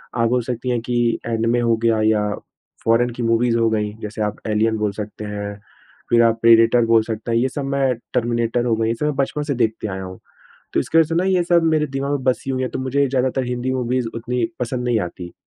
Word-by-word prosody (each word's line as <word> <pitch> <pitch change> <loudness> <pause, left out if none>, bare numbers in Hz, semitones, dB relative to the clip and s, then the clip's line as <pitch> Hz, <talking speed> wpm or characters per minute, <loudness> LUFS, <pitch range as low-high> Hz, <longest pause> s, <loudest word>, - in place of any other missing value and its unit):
आप 115 -1 +2
बोल 125 0 +2
सकती 125 +1 -4
हैं 120 -1 +1
कि 120 +1 -3 0.3
एनीमे 115 +1 +1
हो 115 -1 +2
गया 115 -2 +3
या 105 -1 +2 0.6
फॉरेन 115 +2 +3
की 120 0 -5
मूवीज़ 115 +1 +2
हो 115 - +3
गईं, 105 -1 -1
जैसे 110 +1 -5
आप 105 - -2
एलियन 110 +1 +1
बोल 105 -1 0
सकते 105 +1 -7
हैं। 105 0 -5 0.5
फिर 120 0 +5
आप 115 0 +2
प्रिडेटर 115 +1 +5
बोल 115 -1 +4
सकते 110 +1 -4
हैं। 115 - +2
ये 130 +3 +2
सब 140 +1 -4
मैं 135 -2 +1 0.2
टर्मिनेटर 120 0 0
हो 115 - +2
गई। 110 0 0
ये 115 - +1
सब 150 - -3
मैं 150 -2 0
बचपन 145 +2 -1
से 145 -1 -2
देखते 110 -2 -1
आया 95 -1 -5
हूँ। 95 0 -9 0.6
तो - - +3
इसकी 165 - +1
वज़ह 160 - +4
से 165 - -2
ना 180 - +2
ये 185 -2 +2
सब 170 -1 +3
मेरे 155 -2 +2
दिमाग 140 0 -3
में 140 - -1
बसी 130 +1 0
हुई 130 -1 -1
है 130 - -1
तो - - -4
मुझे 135 +2 +1
ज़्यादातर 130 0 0
हिंदी 125 +1 -2
मूवीज़ 125 -1 -1
उतनी 120 +1 -2 0.2
पसंद 125 0 -2
नहीं 120 -2 +1
आती। 85 -1 -6
120 Hz, 240 wpm, -20 LUFS, 110-130 Hz, 0.6 s, फिर